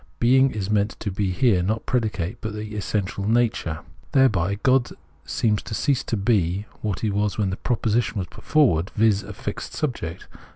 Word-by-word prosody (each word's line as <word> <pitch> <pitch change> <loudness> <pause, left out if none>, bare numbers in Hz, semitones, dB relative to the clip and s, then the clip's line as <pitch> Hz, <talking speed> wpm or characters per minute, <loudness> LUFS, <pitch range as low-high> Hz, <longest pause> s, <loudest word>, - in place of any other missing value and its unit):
Being 130 +3 +5
is 105 -4 -3
meant 105 0 +1
to 100 - -2
be 95 0 -1
here 95 0 +3
not 110 +5 -1
predicate 110 -5 -1
but 110 -1 -4
the 105 0 -6
essential 100 -1 -2
nature. 110 -9 +1 0.3
Thereby, 100 -9 +3
God 130 -2 +3 0.4
seems 110 -6 +1
to 110 - -5
cease 140 +1 +1
to 115 - -1
be 100 -2 +1 0.2
what 105 -4 -2
he 110 - 0
was 105 0 0
when 100 -3 +1
the - - -2
proposition 115 -1 0
was 95 - -1
put - - -14
forward, 110 - +3
viz. 105 -2 +3
a 105 - -9
fixed - - -6
subject. 90 - -3
105 Hz, 180 wpm, -24 LUFS, 100-120 Hz, 0.4 s, Being